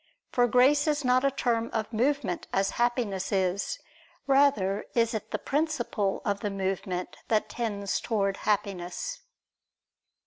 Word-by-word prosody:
For 245 -1 +3
grace 270 +5 +4
is 295 -2 +1
not 250 +1 +4
a 275 - +4
term 235 -4 0
of 220 0 -2
movement, 255 -4 0
as 195 0 +1
Happiness 230 -6 0
is; 190 0 0 0.5
rather 270 -8 +3
is 230 -1 +2
it 220 - -4
the - - -1
principle 275 -10 -1
of 200 -1 0
the 210 - -2
movement 190 -2 -3
that 215 -2 +1
tends 205 -4 -2
towards 200 -4 -1
Happiness. 205 - -2
220 Hz, 135 wpm, -28 LUFS, 195-255 Hz, 0.5 s, grace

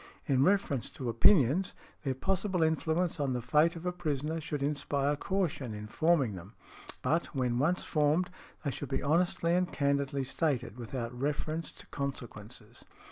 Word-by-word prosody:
In 135 -3 +3
reference 170 -8 +2
to 125 -3 -3
opinions, 145 - +4 0.3
their 135 -2 -1
possible 190 +3 0
influence 160 +2 +1
on 140 -3 0
the 125 - -1
fate 150 +7 +3
of 165 +1 -8
a 180 - +1
prisoner 160 -2 -2
should 150 -2 -3
inspire 145 0 0
caution 145 - -2
in 105 0 -6
|107| - - -11
forming 155 -9 +3
them; 95 +4 -9 0.5
but, 165 +2 +1
when 125 -2 +1
once 170 +7 +2
formed, 155 +4 +2 0.3
they 140 - +1
should 145 - -6
be 135 - -1
honestly 170 +2 +2
and 180 0 +1
candidly 140 -1 0
stated, 135 -5 -1
without 120 0 -4
reference 150 +5 -2
to - - -13
consequences." 120 -4 -6
145 Hz, 160 wpm, -31 LUFS, 130-165 Hz, 0.5 s, opinions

